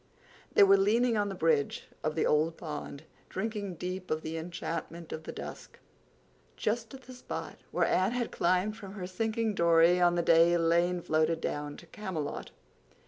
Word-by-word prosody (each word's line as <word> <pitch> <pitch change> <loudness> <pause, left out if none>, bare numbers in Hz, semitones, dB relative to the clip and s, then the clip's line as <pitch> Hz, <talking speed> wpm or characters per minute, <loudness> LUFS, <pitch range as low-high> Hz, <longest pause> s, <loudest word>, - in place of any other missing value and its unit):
They - - +8
were 195 0 +7
leaning 230 +5 +3
on 205 -1 +1
the 195 - -5
bridge 155 -5 +1 0.2
of 155 0 -1
the 160 - +1
old 160 +2 +2
pond, 150 -2 -6 0.3
drinking 205 -2 -3
deep 185 +2 -5
of 155 0 -1
the 160 +1 -4
enchantment 165 0 -5
of 155 - -7
the - - -5
dusk, - - -9 0.8
just 230 +3 -2
at 265 - -13
the 255 - -11
spot 250 - -6
where - - +1
Anne 190 +5 +2
had 245 -1 -2
climbed 185 +4 +1
from 195 -3 -9
her 195 -3 -5
sinking 220 +4 -1
Dory 170 0 +4
on 175 0 +4
the 170 - +1
day 165 +1 +5
Elaine 170 +1 +2
floated 160 +1 +1
down 145 -2 -4
to - - -13
Camelot. 170 -5 -5
175 Hz, 175 wpm, -30 LUFS, 165-205 Hz, 0.8 s, They